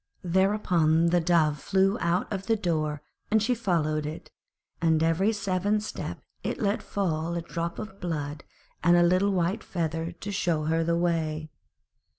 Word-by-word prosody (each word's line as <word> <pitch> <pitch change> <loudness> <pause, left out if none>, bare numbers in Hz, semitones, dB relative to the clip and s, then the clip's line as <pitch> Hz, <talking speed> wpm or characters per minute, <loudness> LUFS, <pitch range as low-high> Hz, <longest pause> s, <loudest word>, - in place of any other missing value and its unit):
Thereupon 175 -3 +3
the 175 - +4
Dove 160 -3 +2
flew 195 +3 +2
out 170 +2 +1
of 195 -1 -4
the 225 - +3
door, 155 -7 -1 0.3
and 220 - +4
she 220 +4 +1
followed 155 -9 0
it, 155 - -8 0.5
and 160 -1 +3
every 165 +6 +2
seventh 205 0 0
step - - -6 0.2
it - - -3
let 205 0 0
fall 170 -4 -2
a 170 - -1
drop 170 0 -4
of 195 -2 -7
blood 150 -4 -3 0.4
and 175 +2 +5
a 175 - +5
little 185 +3 +3
white 185 +3 0
feather 165 -1 -2
to 195 +4 -7
show 175 -5 0
her 165 +2 +1
the 170 +1 +1
way. 160 -3 -1
170 Hz, 160 wpm, -27 LUFS, 160-195 Hz, 0.5 s, and